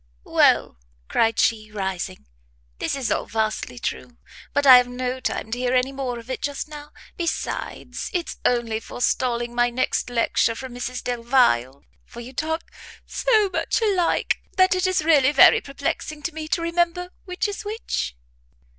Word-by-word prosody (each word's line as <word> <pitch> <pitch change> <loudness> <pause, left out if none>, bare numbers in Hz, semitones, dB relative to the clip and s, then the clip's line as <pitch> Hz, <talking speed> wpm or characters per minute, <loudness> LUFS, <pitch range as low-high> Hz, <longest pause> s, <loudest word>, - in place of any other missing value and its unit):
"Well," - - +3 0.3
cried 225 0 +2
she, 215 -2 +1
rising, 190 -2 -4 0.5
"this - - -1
is 270 -4 -2
all - - 0
vastly 220 +2 -2
true; 240 0 -5 0.3
but 285 0 +1
I 260 -2 +11
have 250 0 +3
no 250 +1 -3
time 220 - -3
to 240 - -2
hear 250 0 +1
any 255 +1 +2
more 265 -3 -4
of 230 0 -11
it 260 - -4
just 285 0 -3
now; 295 -1 -10 0.3
besides, 340 -3 -4
it's 355 -3 -3
only 235 -3 +1
forestalling 240 0 -1
my 240 0 +2
next 250 +1 -1
lecture 230 -1 +1
from 260 +1 -8
Mrs 245 0 -5
Delvile, 230 - +1 0.2
for 235 - -12
you 240 +2 -9
talk 320 +4 -2 0.4
so 440 -5 +2
much - - 0
alike, 390 -6 +1 0.2
that 370 0 +5
it 370 +1 +1
is 370 -4 0
really 290 -4 +5
very 285 - +7
perplexing 280 +2 -4
to 350 - -2
me 315 0 -6
to 335 +1 -1
remember 345 +1 0
which 365 +3 -2
is 410 +1 -5
which." 415 - -3
255 Hz, 165 wpm, -23 LUFS, 240-330 Hz, 0.5 s, I